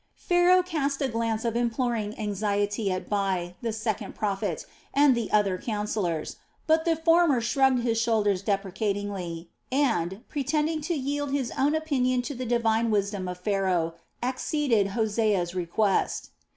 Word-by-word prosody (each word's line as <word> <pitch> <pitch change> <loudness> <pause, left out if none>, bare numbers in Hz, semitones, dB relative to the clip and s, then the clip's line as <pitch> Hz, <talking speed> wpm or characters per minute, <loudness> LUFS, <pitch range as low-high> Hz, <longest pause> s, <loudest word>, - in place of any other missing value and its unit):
Pharaoh 355 +1 +4
cast 290 -6 -1
a - - +2
glance 230 -1 -1
of 230 -1 0
imploring 235 -2 -1
anxiety 205 0 -1
at 185 - -3
Bai, 190 -4 -1
the 230 -2 -1
second 215 -1 -3
prophet, 200 -2 -2 0.3
and 285 -1 +6
the 235 -3 -2
other 200 -3 +2
councillors; 210 -7 -2 0.3
but 320 0 +3
the 335 -1 +3
former 330 -4 +4
shrugged 255 +1 +2
his 230 -1 +1
shoulders 210 -5 +2
deprecatingly 195 -3 -3 0.2
and, 225 -8 0
pretending 305 +2 -1
to 340 - +1
yield 285 0 -2
his 270 -3 -1
own 290 +3 +2
opinion 255 -5 +1
to 285 - -4
the 255 -1 -5
divine 230 -1 +2
wisdom 200 -2 0
of 180 0 -4
Pharaoh, 180 -3 0 0.3
acceded 255 -3 +1
to 195 - -7
Hosea's 210 -5 +1
request. 185 +3 0
225 Hz, 145 wpm, -27 LUFS, 200-270 Hz, 0.3 s, and